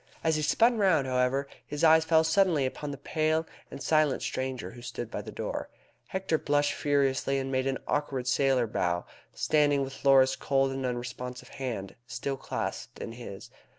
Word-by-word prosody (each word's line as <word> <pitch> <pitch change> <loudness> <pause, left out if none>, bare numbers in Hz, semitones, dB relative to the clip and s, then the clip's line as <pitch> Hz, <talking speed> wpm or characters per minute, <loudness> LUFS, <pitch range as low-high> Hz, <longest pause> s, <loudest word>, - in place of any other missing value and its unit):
As 160 -1 +2
he 155 - 0
spun 230 +10 +3
round, 175 -9 +4
however, 130 +2 +1 0.2
his 150 +2 -5
eyes 160 0 +6
fell 160 0 +4
suddenly 160 -3 +3
upon 145 +3 -4
the 140 - -5
pale 155 +2 0 0.2
and 140 - -8
silent 155 -3 +2
stranger 130 -1 -3
who 120 +1 -12
stood 120 -1 -6
by - - -3
the - - -8
door. - - -4 0.4
Hector 190 -4 -1
blushed 145 0 +1
furiously, 140 -1 +1
and 135 0 -2
made 130 0 0
an 135 -1 0
awkward 140 -4 -1
sailor 130 -1 +2
bow, 90 -5 -1 0.3
standing 145 -2 +3
with 135 0 -8
Laura's 135 -1 +6
cold 135 -1 +1
and 135 -1 -2
unresponsive 125 +1 -5
hand 120 -8 -5
still 135 +3 -3
clasped - - -5
in - - -6
his. 115 -5 -9
135 Hz, 175 wpm, -29 LUFS, 125-150 Hz, 0.4 s, eyes